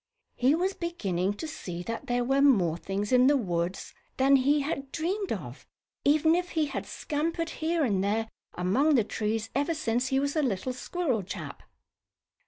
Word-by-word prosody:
He 260 Hz, +4 st, +3 dB
was 370 Hz, +4 st, 0 dB
beginning 200 Hz, -, -2 dB
to 315 Hz, -, -5 dB
see 175 Hz, -, -6 dB
that 230 Hz, +4 st, -5 dB
there 245 Hz, 0 st, +1 dB
were 270 Hz, +3 st, +2 dB
more 195 Hz, -, +4 dB
things 195 Hz, +4 st, -3 dB
in 250 Hz, 0 st, +6 dB
the 290 Hz, 0 st, +5 dB
woods 180 Hz, -4 st, -2 dB, 0.2 s
than 270 Hz, +1 st, +5 dB
he 285 Hz, +3 st, +3 dB
had 275 Hz, -2 st, -4 dB
dreamed 375 Hz, +5 st, -2 dB
of, -, -, -6 dB, 0.4 s
even 310 Hz, +2 st, +4 dB
if 355 Hz, +1 st, 0 dB
he 310 Hz, -, +3 dB
had 285 Hz, -, -5 dB
scampered 330 Hz, +2 st, -2 dB
here 325 Hz, 0 st, +1 dB
and 200 Hz, -7 st, +1 dB
there 220 Hz, +3 st, 0 dB, 0.3 s
among 255 Hz, -, +2 dB
the 235 Hz, -, +4 dB
trees 220 Hz, +1 st, -2 dB
ever 290 Hz, +5 st, 0 dB
since 245 Hz, -3 st, 0 dB
he 265 Hz, 0 st, +1 dB
was 280 Hz, +2 st, -1 dB
a 310 Hz, -, +3 dB
little 250 Hz, -1 st, -1 dB
squirrel 255 Hz, -, -1 dB
chap. 185 Hz, -, -7 dB
265 Hz, 180 wpm, -28 LUFS, 210-310 Hz, 0.4 s, in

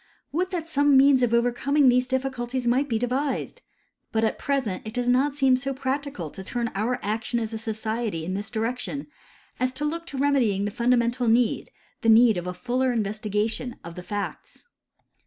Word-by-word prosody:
Would 360 Hz, +5 st, 0 dB
that 345 Hz, -4 st, -4 dB
some 290 Hz, -3 st, +4 dB
means 270 Hz, -1 st, +6 dB
of 245 Hz, -2 st, +2 dB
overcoming 245 Hz, +4 st, +2 dB
these 250 Hz, 0 st, +4 dB
difficulties 260 Hz, -1 st, -2 dB
might 255 Hz, +4 st, +2 dB
be 225 Hz, -, +1 dB
devised! 265 Hz, -, -2 dB, 0.5 s
But 220 Hz, 0 st, +1 dB
at 220 Hz, -, 0 dB
present 265 Hz, -10 st, -1 dB
it 220 Hz, +2 st, -8 dB
does 245 Hz, 0 st, -1 dB
not 265 Hz, +3 st, +2 dB
seem 265 Hz, -3 st, +4 dB
so 270 Hz, +1 st, -3 dB
practical 265 Hz, -, -3 dB
to 190 Hz, -, -9 dB
turn 235 Hz, +3 st, -2 dB
our 225 Hz, +5 st, 0 dB
action 220 Hz, +3 st, -1 dB
as 225 Hz, -1 st, -4 dB
a 220 Hz, -, -3 dB
society 220 Hz, -5 st, -3 dB
in 185 Hz, -, -3 dB
this 200 Hz, +2 st, -4 dB
direction 245 Hz, +5 st, -3 dB, 0.5 s
as 255 Hz, 0 st, +1 dB
to 295 Hz, +3 st, -2 dB
look 335 Hz, +3 st, -3 dB
to 280 Hz, -, -6 dB
remedying 255 Hz, -8 st, +2 dB
the 205 Hz, -, -2 dB
funda 245 Hz, +3 st, +2 dB
mental 235 Hz, +1 st, 0 dB
need 230 Hz, +1 st, +2 dB, 0.2 s
— -, -, -37 dB
the 230 Hz, -, +2 dB
need 225 Hz, -2 st, +6 dB
of 175 Hz, 0 st, -4 dB
a 180 Hz, -, -3 dB
fuller 250 Hz, +6 st, 0 dB
investigation 215 Hz, +2 st, -2 dB
of 170 Hz, -, -8 dB
the 180 Hz, -, -8 dB
facts. 205 Hz, +2 st, -6 dB
245 Hz, 195 wpm, -25 LUFS, 220-270 Hz, 0.5 s, means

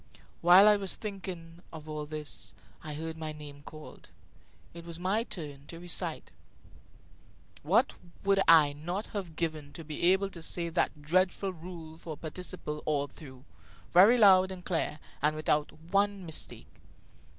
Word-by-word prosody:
While 180 Hz, +4 st, +8 dB
I 210 Hz, -1 st, +7 dB
was 195 Hz, -2 st, -2 dB
thinking 180 Hz, -5 st, -7 dB
of 155 Hz, -1 st, -10 dB
all 150 Hz, -1 st, -5 dB
this, 150 Hz, -1 st, -5 dB, 0.3 s
I 150 Hz, -1 st, -5 dB
heard 160 Hz, +1 st, -5 dB
my 155 Hz, -1 st, -4 dB
name 145 Hz, -2 st, -10 dB
called. 155 Hz, +1 st, -12 dB, 0.6 s
It 170 Hz, 0 st, -9 dB
was 170 Hz, 0 st, -8 dB
my 195 Hz, +5 st, +1 dB
turn 145 Hz, -, -8 dB
to 165 Hz, -, -8 dB
recite. 175 Hz, -1 st, -1 dB, 1.3 s
What -, -, +3 dB, 0.3 s
would 195 Hz, 0 st, +3 dB
I 155 Hz, -3 st, +7 dB
not 175 Hz, +8 st, -4 dB
have 185 Hz, -6 st, -5 dB
given 155 Hz, -3 st, -3 dB
to 165 Hz, -, -8 dB
be 155 Hz, -1 st, -6 dB
able 195 Hz, +1 st, +1 dB
to 170 Hz, -, -9 dB
say 170 Hz, +1 st, -2 dB
that 160 Hz, -3 st, -1 dB
dreadful 185 Hz, +4 st, +1 dB
rule 165 Hz, -2 st, -10 dB
for 160 Hz, -2 st, -6 dB
the -, -, -23 dB
participle 160 Hz, -2 st, -5 dB
all 145 Hz, -2 st, +1 dB
through, 130 Hz, -3 st, -13 dB, 0.5 s
very 200 Hz, +8 st, +7 dB
loud 190 Hz, -4 st, +7 dB
and 185 Hz, -2 st, -8 dB
clear, 165 Hz, -3 st, -1 dB, 0.2 s
and 150 Hz, +2 st, +2 dB
without 150 Hz, -1 st, +1 dB
one 195 Hz, +4 st, -1 dB
mistake? 160 Hz, -2 st, -4 dB
165 Hz, 155 wpm, -30 LUFS, 155-185 Hz, 1.3 s, While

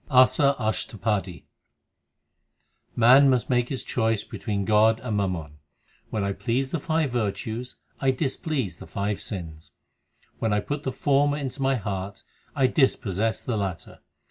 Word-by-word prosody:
ASA 135 Hz, +1 st, +5 dB
ASHTAPADI 110 Hz, -4 st, -2 dB, 1.5 s
Man 130 Hz, +4 st, +7 dB
must 130 Hz, 0 st, +1 dB
make 120 Hz, -1 st, +2 dB
his 135 Hz, -, -3 dB
choice 115 Hz, -3 st, 0 dB
between 100 Hz, -3 st, -3 dB
God 110 Hz, +2 st, +4 dB
and 115 Hz, -4 st, -3 dB
mammon: 85 Hz, -7 st, -2 dB, 0.5 s
When 105 Hz, -, -2 dB
I 100 Hz, 0 st, -1 dB
please 130 Hz, +5 st, -1 dB
the 170 Hz, -, -1 dB
five 155 Hz, -2 st, 0 dB
virtues, 115 Hz, +1 st, -3 dB, 0.2 s
I 135 Hz, -, +2 dB
displease 130 Hz, -, -1 dB
the -, -, -11 dB
five 100 Hz, 0 st, -2 dB
sins. 80 Hz, -6 st, -7 dB, 0.7 s
When 110 Hz, -2 st, 0 dB
I 105 Hz, -, +2 dB
put 145 Hz, +7 st, -4 dB
the 135 Hz, -, -2 dB
former 145 Hz, +1 st, +2 dB
into 140 Hz, -1 st, -5 dB
my 135 Hz, 0 st, +2 dB
heart, 100 Hz, -2 st, -4 dB, 0.3 s
I 135 Hz, -3 st, +3 dB
dispossess 115 Hz, -, +1 dB
the 120 Hz, -4 st, -2 dB
latter. 95 Hz, -4 st, -4 dB
115 Hz, 145 wpm, -25 LUFS, 100-135 Hz, 1.5 s, Man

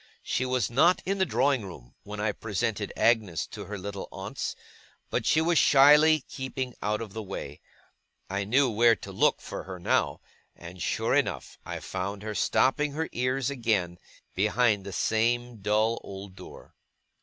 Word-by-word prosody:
She 130 Hz, -, -1 dB
was 125 Hz, -5 st, 0 dB
not 170 Hz, +9 st, +4 dB
in 195 Hz, +1 st, -1 dB
the 190 Hz, -, +2 dB
drawing 135 Hz, -5 st, +2 dB
room 70 Hz, -11 st, -11 dB
when 105 Hz, 0 st, -8 dB
I 105 Hz, 0 st, +1 dB
presented 105 Hz, 0 st, -3 dB
Agnes 110 Hz, -9 st, +2 dB
to -, -, -9 dB
her 105 Hz, -, -6 dB
little 100 Hz, 0 st, -6 dB
aunts, -, -, -5 dB, 0.6 s
but -, -, 0 dB
was 165 Hz, +2 st, +3 dB
shyly 150 Hz, +2 st, +6 dB
keeping 130 Hz, -1 st, -5 dB
out 105 Hz, +1 st, -1 dB
of 105 Hz, -4 st, -10 dB
the 110 Hz, -, -4 dB
way. 95 Hz, -8 st, -7 dB, 0.7 s
I 100 Hz, +1 st, -2 dB
knew 130 Hz, +7 st, +3 dB
where 115 Hz, 0 st, +4 dB
to 95 Hz, -, -10 dB
look -, -, +2 dB
for -, -, -7 dB
her, 95 Hz, -1 st, -7 dB
now; 85 Hz, -, 0 dB, 0.4 s
and 85 Hz, +1 st, -11 dB
sure -, -, 0 dB
enough -, -, -1 dB
I -, -, -4 dB
found 100 Hz, +2 st, -4 dB
her 110 Hz, 0 st, -4 dB
stopping 140 Hz, +6 st, +2 dB
her 160 Hz, +2 st, -2 dB
ears 130 Hz, +2 st, -1 dB
again, 105 Hz, -9 st, -1 dB, 0.3 s
behind 105 Hz, 0 st, +1 dB
the -, -, -5 dB
same 120 Hz, +4 st, 0 dB
dull 105 Hz, +3 st, +1 dB
old 95 Hz, 0 st, -9 dB
door. 95 Hz, -, -13 dB
110 Hz, 165 wpm, -27 LUFS, 100-130 Hz, 0.7 s, shyly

